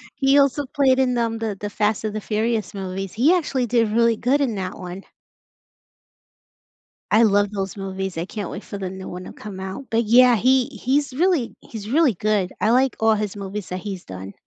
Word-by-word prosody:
He 275 +1 +3
also 280 0 +3
played 265 -1 +2
in 255 -1 +2
the, 235 - +1
um, 225 -1 -1
Th 215 -3 -3
The 205 - -4
Fast 210 +1 0
and 215 -1 -2
the 215 - -3
Furious 220 +1 -1
movies; 190 -1 -5
he 275 +11 +4
actually 275 -8 0
did 230 -1 +2
really 230 0 +3
good 275 +4 +1
in 235 -6 0
that 185 -1 -4
one. 180 +1 -8 2.1
I 225 +2 +6
love 205 -1 +3
those 195 -2 -4
movies, 190 -3 -4
I 170 - -2
can't 200 -1 -6
wait 200 - -7
for 200 - -7
the 190 -2 -4
new 190 0 -8
one 180 +1 -7
to - - -10
come 200 -3 -9
out. 190 +8 -6
But 230 +1 +1
yeah, 245 +2 +6
he 255 +3 +3
he's 275 +2 -1
really 325 -3 +1
he's 215 -2 -9
really 290 -2 +4
good, 205 -1 0
I 215 - +3
like 260 +2 +3
all 220 0 +4
his 210 -1 -3
movies 200 0 -6
that 185 0 -4
he's 195 -3 -6
done. 95 +1 -8
215 Hz, 210 wpm, -22 LUFS, 195-250 Hz, 2.1 s, I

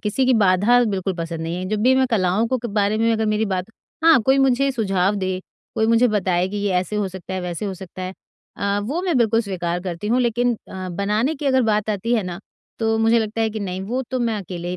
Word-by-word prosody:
किसी 235 +5 0
की 255 - +4
बाधा 210 +4 +4
बिल्कुल 190 -3 -2
पसंद 165 -1 -5
नहीं 165 +2 -3
है। 185 - -4
जब 215 0 -1
भी 260 +2 +5
मैं 260 0 +3
कलाओं 200 +1 +2
को 255 - 0
क - - +1
बारे 210 0 0
में 230 +1 +2
अगर 220 -1 0
मेरी 215 +1 +1
बात 185 -2 -1 0.4
हाँ, 325 -7 +7
कोई 265 +4 +3
मुझे 270 +1 +3
सुझाव 195 -4 +1
दे, 185 -1 -2 0.3
कोई 220 - +1
मुझे 230 +2 +4
बताए 185 -3 +1
कि 205 - -5
ये 200 -1 -1
ऐसे 185 +4 -1
हो 205 -2 0
सकता 190 0 -7
है, 185 - -2
वैसे 180 +2 -4
हो 195 -2 -3
सकता 185 0 -9
है, 185 +1 -4 0.4
अ, 200 0 0
वो 300 - -2
मैं 350 -7 0
बिल्कुल 225 0 +3
स्वीकार 175 -4 -3
करती 180 +2 -5
हूँ। 250 +2 +2
लेकिन, 240 0 +1
अ, 185 -1 -6
बनाने 210 - 0
की 285 0 -5
अगर 260 -1 +3
बात 215 -1 +1
आती 220 +4 -1
है 220 - +1
ना, 180 -1 -5 0.4
तो 225 -1 +1
मुझे 225 +1 +4
लगता 220 0 -2
है 220 - +1
कि 215 0 -5
नहीं 185 -1 -4
वो 245 +6 -2
तो 255 - -1
मैं 230 -2 0
अकेले 175 0 -5
210 Hz, 250 wpm, -21 LUFS, 185-235 Hz, 0.4 s, हाँ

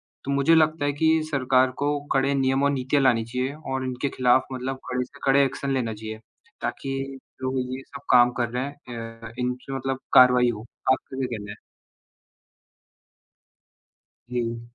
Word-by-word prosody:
है। - - -
तो 140 - -2
मुझे 140 +4 +4
लगता 155 -2 +3
है 145 - +1
कि 160 +2 +3
सरकार 130 -2 +3
को 145 0 +1
कड़े 135 +1 +2
नियम 135 0 +2
और 140 - +3
नीतियाँ 135 +1 +1
लानी 120 -3 +4
चाहिए 125 +4 -2 0.2
और 130 0 -1
इनके 130 +2 -2
खिलाफ 130 0 +4
मतलब 130 +1 -4
कड़े 125 0 0
से 140 +3 -18
कड़े 140 +1 +5
एक्शन 135 +1 -3
लेना 120 -4 -1
चाहिए 110 0 -7 0.4
ताकि 135 0 -3 0.4
जो 130 0 -1 0.2
ये 130 - -7
सब - - -10
काम 125 0 +7
कर 120 - 0
रहे 125 +2 -2
हैं 115 -5 -8
अ, 115 -1 -8
इनसे 125 +2 -3
मतलब 135 0 -3
करवाई 125 -1 +7
हो। 110 -1 -5 0.3
आपका 130 0 -2
क्या 135 - 0
कहना 105 -1 -8
है? 105 - -9 2.7
जी। 120 -1 -2
130 Hz, 170 wpm, -25 LUFS, 125-140 Hz, 2.7 s, काम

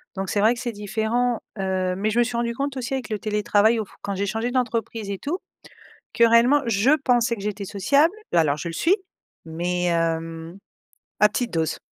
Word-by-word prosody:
donc 195 -1 -3
c'est 205 - 0
vrai 225 +4 +4
que - - -8
c'est 240 -2 -3
différent, 220 +3 -1 0.2
heu, 185 -1 0
mais 210 +3 -1
je 225 - -2
me 240 - +5
suis 240 0 -4
rendue 235 0 -1
compte 280 +1 -3
aussi 255 +2 -2
avec 250 -4 -5
le 215 -2 -2
télétravail 210 +1 +2
auf 215 - -4
quand 200 0 -3
j'ai 200 +1 -1
changé 225 +4 -2
d'entreprise 230 -4 -2
et 195 - -4
tout, 330 +6 -2 0.8
que 235 - +3
réellement 240 +5 +5
je 225 +2 +2 0.2
pensais 240 -1 +3
que 200 - -10
j'étais 205 -1 -3
sociable 280 - +2 0.2
l 170 - +3
alors 150 -3 +2
je 170 - -5
le - - -6
suis 355 - +3 0.5
mais, 175 +2 -2
hem, 165 0 -2 0.6
à 210 - +7
petite 240 +3 -2
dose. 160 -1 -1
215 Hz, 205 wpm, -23 LUFS, 190-240 Hz, 0.8 s, à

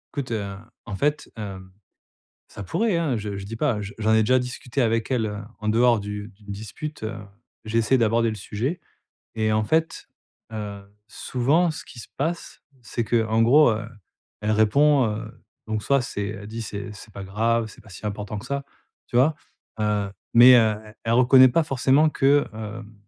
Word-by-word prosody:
Écoute, 140 -4 -4
heu, 100 -3 -3 0.3
en 105 - -5
fait, 150 +7 -1
hem, 95 -3 -7 0.8
ça 100 - -9
pourrait 210 - 0
hein! 160 -7 0
Je 105 -2 -4
je 100 - -6
dis 110 +3 -7
pas, 120 -4 0
je 100 0 -6
j'en 110 0 +2
ai 110 - +5
déjà 130 +4 +4
discuté 125 +1 -4
avec 115 -1 +1
elle, 120 -4 +1
heu, 105 -1 -5 0.2
en 110 - -7
dehors 120 +2 +4
du 105 0 -6
d'une 100 -1 -11
dispute, 110 +9 -7
heu, 110 - -4 0.5
j'ai 110 +1 0
essayé 115 +4 +3
d'aborder 115 0 +2
le 110 - -3
sujet 120 - -3 0.5
et 110 -1 0
en 110 0 +1
fait, 160 +7 0 0.5
heu, 105 -2 -6 0.3
souvent, 145 +11 +1
ce 155 - -7
qui - - -14
se 115 - -10
passe, 165 +5 -4 0.2
c'est 120 0 -3
que, 115 0 +1
en 110 +1 +1
gros, 125 +4 +6
heu, 110 0 -3 0.5
elle 105 - 0
répond, 130 +6 +4
heu, 110 +1 -4 0.3
donc 110 -1 -2
soit 140 +2 +2
c'est 105 -4 -4
elle 105 -1 -7
dit: 115 +2 -6
«C'est 100 -1 -6
c'est 105 +1 -13
pas 100 - -7
grave, 115 +4 0
c'est - - -15
pas - - -18
si 95 +1 -12
important 105 0 -4
que 100 - -9
ça» 140 +2 -3 0.4
tu - - -4
vois? 140 +6 +4 0.5
Heu, 105 -2 0 0.2
mais, 125 +2 +9
heu, - - +7 0.2
e 105 0 -13
elle 115 - 0
reconnaît 130 +1 +7
pas 145 +7 +2
forcément 135 +2 +3
que, 140 0 +3
hem, 110 0 -8
110 Hz, 195 wpm, -24 LUFS, 105-130 Hz, 0.8 s, mais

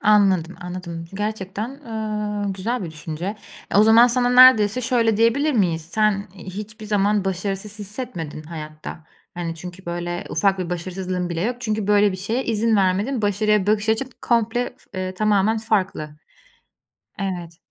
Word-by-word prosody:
Anladım, 195 -5 +3
anladım 175 -2 -6
gerçekten, 210 +1 -3
ııı, 215 -6 -3
güzel 215 +5 -2
bir 165 - -6
düşünce. 160 +6 -5 0.3
E, - - +1
o 205 - +8
zaman 225 +2 +7
sana 245 0 +2
neredeyse 250 -3 +7
şöyle 230 -3 +2
diyebilir 280 +7 +3
miyiz: 175 -8 +1
Sen, 200 +4 0
iii, 190 0 -9
hiçbir 215 +3 -8
zaman 205 -1 +2
başarısız 195 +3 -3
hissetmedin 200 - -6
hayatta. 155 0 -8 0.3
Hani, 170 -1 -4
çünkü, 180 +2 -10
böyle, 175 0 -3
ufak 195 +3 +2
bir 180 -1 -3
başarısızlığın 180 +1 -3
bile 165 0 -2
yok. 240 +5 -1
Çünkü, 215 -4 -2
böyle, 205 -1 +4
bir - - -4
şeye 225 +7 -2
izin 225 0 +2
vermedin, 200 +6 +1
başarıya 205 0 +2
bakış 215 +1 +1
açın 235 +4 +1
komple 235 +1 +1
f 185 - -8
ııı, 185 0 -3
tamamen 215 +2 +2
farklı. 190 -9 -1 1.0
Evet. 175 -4 -4
205 Hz, 155 wpm, -22 LUFS, 180-220 Hz, 1.0 s, o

